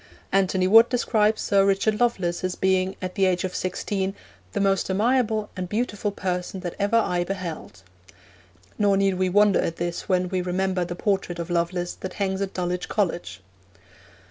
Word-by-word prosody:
Antony 190 Hz, -1 st, +2 dB
Wood 225 Hz, +4 st, +7 dB
describes 220 Hz, -3 st, +1 dB
Sir 200 Hz, -1 st, +3 dB
Richard 200 Hz, +2 st, +1 dB
Lovelace 185 Hz, -9 st, 0 dB
as 185 Hz, 0 st, -1 dB
being, 190 Hz, 0 st, +1 dB
at 185 Hz, 0 st, -3 dB
the 195 Hz, -, +2 dB
age 180 Hz, -1 st, 0 dB
of 185 Hz, -1 st, -3 dB
sixteen, 190 Hz, +1 st, -2 dB, 0.4 s
'the -, -, -2 dB
most 195 Hz, -1 st, +1 dB
amiable 220 Hz, +1 st, +1 dB
and 185 Hz, -2 st, -4 dB
beautiful 210 Hz, -1 st, -1 dB
person 185 Hz, -1 st, -3 dB
that 175 Hz, -2 st, -4 dB
ever 205 Hz, +3 st, +2 dB
eye 180 Hz, -6 st, +1 dB
beheld.' 175 Hz, -, -6 dB, 1.0 s
Nor 200 Hz, -2 st, +3 dB
need 195 Hz, 0 st, +2 dB
we 185 Hz, 0 st, +2 dB
wonder 205 Hz, +1 st, +4 dB
at 165 Hz, -, -2 dB
this 175 Hz, +3 st, -4 dB
when 180 Hz, -1 st, +2 dB
we 185 Hz, -1 st, -1 dB
remember 185 Hz, +1 st, -1 dB
the 175 Hz, 0 st, -5 dB
portrait 190 Hz, -2 st, -1 dB
of 170 Hz, +1 st, -5 dB
Lovelace 175 Hz, +1 st, -1 dB
that 185 Hz, -, -7 dB
hangs 195 Hz, -1 st, -2 dB
at 195 Hz, -1 st, -3 dB
Dulwich 180 Hz, 0 st, -2 dB
College. 175 Hz, -, -2 dB
190 Hz, 170 wpm, -24 LUFS, 180-205 Hz, 1.0 s, Wood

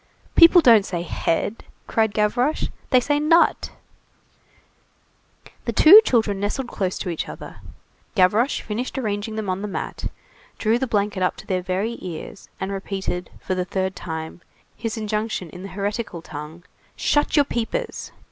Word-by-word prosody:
"People 340 Hz, +1 st, +8 dB
don't 230 Hz, -7 st, +7 dB
say 175 Hz, -3 st, -3 dB
'head,'" 175 Hz, +5 st, -2 dB, 0.2 s
cried 220 Hz, -2 st, 0 dB
Gavroche, 245 Hz, +8 st, +1 dB, 0.2 s
"they 255 Hz, -, +5 dB
say 290 Hz, +4 st, 0 dB
'nut'." 330 Hz, +3 st, +3 dB, 2.0 s
The -, -, -2 dB
two 390 Hz, +8 st, +9 dB
children 220 Hz, -, +1 dB
nestled 240 Hz, +5 st, -2 dB
close 190 Hz, -5 st, -2 dB
to -, -, -4 dB
each 165 Hz, -, -4 dB
other, -, -, -9 dB, 0.6 s
Gavroche 210 Hz, +7 st, +3 dB
finished 235 Hz, +6 st, -4 dB
arranging 215 Hz, -3 st, -2 dB
them 220 Hz, -2 st, -3 dB
on 185 Hz, +1 st, -2 dB
the 210 Hz, -, -3 dB
mat, 200 Hz, -, -5 dB, 0.5 s
drew 225 Hz, +2 st, +1 dB
the 265 Hz, -, -1 dB
blanket 205 Hz, -3 st, 0 dB
up 180 Hz, -, +1 dB
to -, -, -12 dB
their 185 Hz, -1 st, -1 dB
very 190 Hz, +6 st, -2 dB
ears, 180 Hz, +2 st, -8 dB
then 190 Hz, +1 st, -3 dB
repeated, 190 Hz, -2 st, -4 dB
for -, -, -3 dB
the 185 Hz, -1 st, -1 dB
third 190 Hz, +1 st, -2 dB
time, 160 Hz, +1 st, -6 dB, 0.3 s
his 225 Hz, -1 st, -4 dB
injunction 215 Hz, -5 st, -3 dB
in 180 Hz, -, -10 dB
the 195 Hz, -, -7 dB
hieratical 200 Hz, -2 st, -4 dB
tongue:— 155 Hz, +2 st, -9 dB, 0.3 s
"Shut 295 Hz, 0 st, +1 dB
your 290 Hz, -2 st, +5 dB
peepers!" 275 Hz, -, -3 dB
205 Hz, 155 wpm, -23 LUFS, 185-235 Hz, 2.0 s, two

